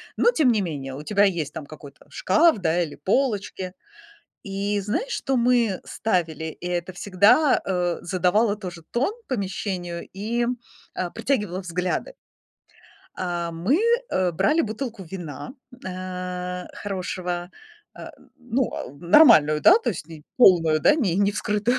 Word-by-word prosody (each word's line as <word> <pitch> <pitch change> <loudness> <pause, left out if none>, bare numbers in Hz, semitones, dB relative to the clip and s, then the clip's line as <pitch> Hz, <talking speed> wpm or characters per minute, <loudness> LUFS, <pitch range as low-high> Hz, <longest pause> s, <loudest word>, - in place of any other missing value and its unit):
но 480 - +4
тем 300 - +3
не 210 - +1
менее, 140 -7 -5
у 145 - -8
тебя 205 +3 +3
есть 165 -7 -1
там 150 - -7
какой-то 145 -1 -13
шкаф, 315 - +3
да, 175 -1 +1
или 155 -4 -4
полочки. 200 -5 -1 0.7
И 200 +1 -2
знаешь, 225 - -2
что 270 -1 -1
мы 235 -5 +2
ставили? 170 -7 -2
И 160 +2 -7
это 180 +1 -3
всегда, 205 - +3
э, 180 -2 -1
задавало 190 +4 +1
тоже 180 -5 -8
тон 275 - 0
помещению 185 -6 -3
и, 230 +5 -1 0.5
э, 180 -1 -3
притягивало 205 -9 -1
взгляды. 180 - -3 1.0
А, 175 -2 -3
мы, 185 - +1 0.3
э, 185 -1 +1
брали 300 - +2
бутылку 225 -1 -5
вина, 170 - -7 0.4
э, 180 -1 -5
хорошего, 180 -3 -4 0.5
э, - - -8 0.3
ну, 250 +1 -1
э, 125 - -6
нормальную, 170 - +6
да, 355 - +7
то - - -1
есть 165 -6 -6
ни 160 -2 -11
полную, 165 -9 +5
да, 295 - +5
не 200 - 0
не 200 0 +2
вскрытую. 210 +5 0
185 Hz, 140 wpm, -24 LUFS, 175-220 Hz, 1.0 s, да